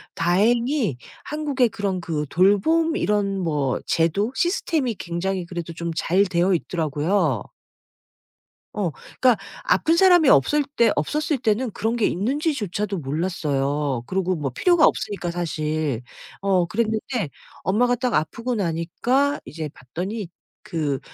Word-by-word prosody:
다행히 220 - +2 0.3
한국에 290 -5 +1
그런 195 -4 -3
그 150 -3 -2
돌봄 315 - +3
이런 205 - 0
뭐 150 -7 0
제도? 185 +8 +1
시스템이 315 - 0
굉장히 180 +1 -3
그래도 170 -1 -6
좀 170 0 -4
잘 185 +4 +2
되어 185 0 +2
있더라고요. 160 - 0 1.3
어 190 -6 -1
그러니까 250 - +1 0.3
아픈 325 +1 +3
사람이 355 -5 +6
없을 290 - +4
때 230 -2 +5
없었을 300 - 0
때는 225 +1 0
그런 225 +4 -1
게 230 - +1
있는지조차도 210 - -1
몰랐어요. 145 -4 -1
그리고 185 -1 0
뭐 145 -4 -2
필요가 345 - +4
없으니까 195 -4 0
사실. 155 -6 -2 0.4
어 190 -3 +2
그랬는데 220 - -1 0.3
엄마가 245 +7 +2
딱 250 0 -1
아프고 235 +10 -1
나니까 210 - 0
이제 155 +2 -6
봤더니 185 - -5 0.3
그 155 -9 -2
190 Hz, 285 characters per minute, -23 LUFS, 165-240 Hz, 1.3 s, 사람이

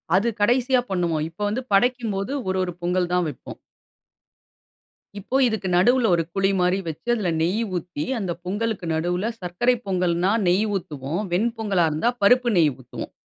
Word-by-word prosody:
அது 205 +5 +3
கடைசியா 250 +3 +3
பண்ணுவோம். 170 -4 0
இப்ப 165 - -30
வந்து 245 +5 -2
படைக்கும்போது 230 -1 +1 0.2
1, 190 - 0
1 180 - -5
பொங்கல் 180 0 0
தான் 180 -1 +2
வெப்போம். 135 - -10 1.6
இப்போ 235 +7 -1
இதுக்கு 220 -5 -1
நடுவுல 240 +5 +4
ஒரு 165 - 0
குழி 195 0 +2
மாரி 180 +1 +2
வெச்சு, 160 +7 -7
அதில 205 -6 -1
நெய் 185 +8 +1
ஊத்தி, 170 -3 -5
அந்த 185 -4 -2
பொங்கலுக்கு 205 0 -2
நடுவுல 180 +7 -1
சர்க்கரை 185 +8 +1
பொங்கல்ன்னா, 180 0 +1 0.2
நெய் 185 +5 +3
ஊத்துவோம். 155 -1 -5
வெண் 215 +7 +2
பொங்கலா 195 -6 +1
இருந்தா 155 +11 +1
பருப்பு 245 +3 +4
நெய் 155 -3 +4
ஊத்துவோம். 130 -3 -8
185 Hz, 155 wpm, -23 LUFS, 175-225 Hz, 1.6 s, நடுவுல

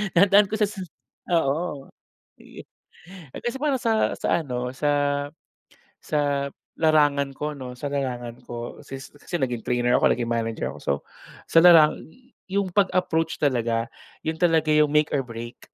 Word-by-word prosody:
dinadaan 200 +3 +6
ko 210 - -10
siya 210 - +3 0.7
oo. 145 -1 -1 0.5
Yeh, - - -13 0.7
eh, - - -7
kasi 240 +2 -2
para 295 -2 +1
sa 225 -2 +1
sa - - +1
ano, 125 -2 -3
sa 145 +2 +1 1.1
sa 145 -2 0 0.3
larangan 145 -3 +3
ko 150 +2 -4
'no 125 -1 -7
sa 145 - -5
larangan 125 -4 -3
ko, 120 0 -7
since 135 0 -9
kasi 145 +5 -11
naging 120 -4 -2
trainer 120 0 +1
ako - - +3
naging 120 -1 -3
manager 115 -1 -2
ako. - - -11
So - - 0 0.6
sa 165 - +5
larangan 165 -4 +6 0.5
'yong 195 -1 0
pag-approach 180 -5 +1
talaga 115 -4 +1 0.4
'yon 160 0 -1
talaga 160 -3 +2
'yong 150 -1 +4
make 150 0 +2
or 135 - +1
break. 115 0 -8
145 Hz, 150 wpm, -24 LUFS, 125-165 Hz, 1.1 s, dinadaan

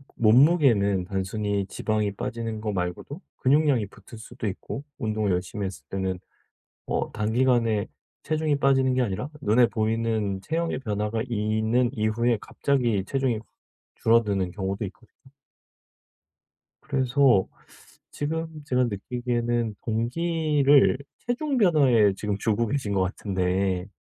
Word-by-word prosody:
몸무게는 115 - +4
단순히 100 +1 -2
지방이 105 -1 -1
빠지는 115 0 -4
거 105 0 -2
말고도 90 - -4 0.2
근육량이 140 -4 +3
붙을 105 +4 -14
수도 115 +1 -6
있고 105 +7 -5
운동을 110 -4 -1
열심히 90 +3 -2
했을 95 -1 -7
때는 95 -1 -2 0.7
어 - - -2
단기간에 115 -1 +1 0.4
체중이 155 -1 0
빠지는 135 -1 +3
게 130 - +2
아니라 115 +4 -2
눈에 120 0 +4
보이는 110 -2 -1
체형의 165 +7 -2
변화가 105 -2 -2
있는 110 +2 +1
이후에 115 +1 +1
갑자기 120 -8 0
체중이 130 -4 0 0.6
줄어드는 105 -5 +2
경우도 95 +2 -3
있거든요. 115 +6 -14 1.5
그래서 130 -5 +3 0.6
지금 160 +3 -3 0.2
제가 125 -2 +1
느끼기에는 120 +1 -2
동기를 145 +4 +2 0.2
체중 265 +3 -2
변화에 135 - +4
지금 105 0 -2
주고 110 +2 +1
계신 110 -3 -2
것 95 -1 +2
같은데 95 -1 -1
115 Hz, 285 characters per minute, -25 LUFS, 100-130 Hz, 1.5 s, 몸무게는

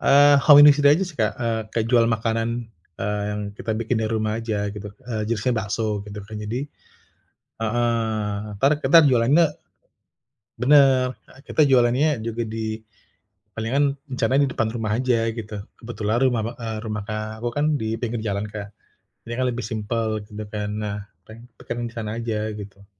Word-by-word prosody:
Eee, 145 +1 +7
home 145 -2 +9
industry 145 -1 +7
aja 185 +5 +2
sih 175 -5 -10
Kak, 110 -1 +1
eee, 115 -1 0
kayak 115 -1 0
jual 120 -2 +5
makanan, 115 +1 -1 0.3
eee, 105 0 -1
yang 105 - -3 0.2
kita 110 - -3
bikin 115 +2 -1
di - - 0
rumah 110 -1 -1
aja, 105 -2 -2
gitu. 105 0 -7 0.2
Eee, 110 -2 -2
jenisnya 115 +2 0
bakso, 105 -1 -2
gitu 105 0 -8
kan. 110 +1 -8
Jadi 120 +7 -4 0.9
heeh, 110 -2 -1 0.2
entar 135 +8 +2
kita 165 +5 +6
jualannya 130 +7 +4 1.1
bener, 130 -1 +5 0.2
e 130 - -17
kita - - +1
jualannya 130 +3 +3
juga 115 0 -3
di 110 0 -4 0.7
palingan 140 +5 0 0.2
rencana 125 +2 +1
di 140 - +3
depan 110 - 0
rumah 110 -3 -3
aja, 125 -3 +2
gitu. 110 -2 -6 0.2
Kebetulan 115 -2 -2
rumah 125 -4 +2
ba 115 - -4
e 115 - -5 0.2
rumah, 105 -1 -3
Kak, 110 +1 -5
aku 120 - 0
kan 145 +1 +1 0.2
dipinggir 115 +1 -2
jalan 100 -1 -2
Kak, 105 0 -7 0.6
ini 115 - -5
kan 130 - +1
lebih 120 -1 -3
simpel 110 0 -2
gitu 105 +1 -7
kan, 105 -1 -3
nah, 105 -1 -3 0.3
peng 115 +2 -13 0.2
pengen 120 -1 -4
di 115 - -15
sana 110 0 -4
aja, 110 -2 -2
gitu. 100 0 -11
115 Hz, 170 wpm, -23 LUFS, 110-125 Hz, 1.1 s, home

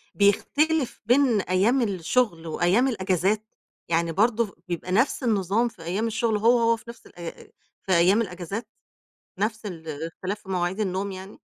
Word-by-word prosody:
بيختلف 285 +8 +2
بين 245 -3 +4
أيام 200 +9 +2
الشغل، 185 -2 0
وأيام 180 +10 +2
الأجازات؟ 195 -1 0 0.5
يعني 170 0 +1
برضه 220 +3 +1
بيبقى 175 +1 -4
نفس 235 +7 +2
النظام 215 0 +1
في 180 -8 -11
أيام 190 +7 -1
الشغل، 225 -1 0
هو، 235 +3 +4
هو 230 0 +3
في - - -17
نفس 235 -1 -11
الأي 170 -1 -10
أي - - -17 0.3
في 190 - -4
أيام 185 +6 +4
الأجازات؟ 195 +2 -5 0.7
نفس 220 +2 -2
الاختلاف 165 +3 -5
في - - -18
مواعيد 185 +2 -1
النوم 195 0 -1
يعني؟ 190 +2 -9
200 Hz, 150 wpm, -25 LUFS, 180-230 Hz, 0.7 s, بين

